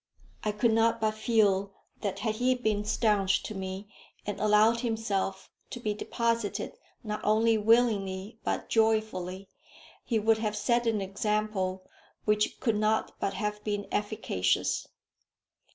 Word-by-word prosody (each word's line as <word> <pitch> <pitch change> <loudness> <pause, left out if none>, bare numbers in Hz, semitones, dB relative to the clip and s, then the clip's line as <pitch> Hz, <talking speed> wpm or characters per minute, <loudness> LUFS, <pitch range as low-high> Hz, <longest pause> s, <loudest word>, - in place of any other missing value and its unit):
I 215 - +1
could 220 +2 +2
not 225 +1 +3
but 215 -1 +1
feel 205 -3 +2 0.3
that 195 -2 -2
had 215 +1 -2
he 255 +2 +2
been 220 -4 0
stanch 205 -3 +2
to - - -5
me, 190 +1 -5 0.4
and 205 - -4
allowed 215 +2 +4
himself 210 -5 -2 0.2
to 245 - -6
be 215 -3 -1
deposited 230 0 -1 0.3
not 215 -1 -4
only 225 +2 +3
willingly 215 -2 +2
but - - -2
joyfully, 215 -4 0 0.6
he 230 - 0
would 220 +1 +3
have 215 -1 -1
set 240 +2 +1
an 220 -3 +1
example 195 -1 -1 0.4
which 210 0 +1
could 225 -4 +1
not 215 +1 +1
but 195 - -1
have 210 -1 -3
been 205 -1 -2
efficacious. 205 - 0
215 Hz, 135 wpm, -29 LUFS, 200-225 Hz, 0.6 s, allowed